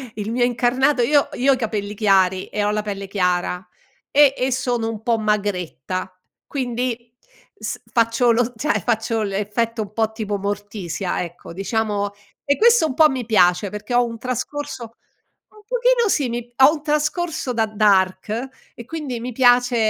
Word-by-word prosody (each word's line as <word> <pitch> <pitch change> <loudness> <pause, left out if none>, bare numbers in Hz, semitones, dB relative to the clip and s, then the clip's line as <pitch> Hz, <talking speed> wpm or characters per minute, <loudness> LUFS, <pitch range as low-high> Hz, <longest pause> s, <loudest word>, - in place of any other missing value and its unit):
il 215 +1 -4
mio 245 0 +2
incarnato 250 +3 +2
io 285 +3 +3
io 275 +2 +2
ho - - +6
i - - -7
capelli 210 -3 -3
chiari, 190 -3 +2
e 210 - -2
ho 205 - +1
la 210 0 0
pelle 200 -2 -6
chiara, 180 -1 -1 0.4
e 285 -1 +5
e 255 +1 0
sono 245 -3 -1
un 220 -1 -6
po' 230 -1 +2
magretta 185 -4 -2 0.3
quindi, 245 -3 -3 0.5
s - - -5
faccio 230 +1 +3
lo 245 +1 +1
cioè 300 +7 0
faccio 225 -1 0
l'effetto 210 +3 -2
un 205 -1 -6
po' 220 0 -1
tipo 210 -2 -3
Morticia, 200 -3 -3
ecco, 175 -1 -8
diciamo 205 +1 -1 0.3
e 285 0 +3
questo 470 -5 +5
un 280 - -2
po' 310 +2 +6
mi 255 -4 -3
piace, 185 -3 +3
perché 210 +5 -6
ho 245 0 +4
un 230 -1 -6
trascorso 255 -1 -5 0.6
un 430 +4 -4
pochino 480 -2 +3
sì 280 -9 +1
mi 240 0 -5
ho 265 +3 +7
un 300 -2 -6
trascorso 300 -1 -1
da 225 -1 +1
dark 210 +3 +1 0.3
e 235 - -10
quindi 275 -5 -5
mi 245 +1 -5
piace 245 0 +4
230 Hz, 170 wpm, -21 LUFS, 205-255 Hz, 0.6 s, ho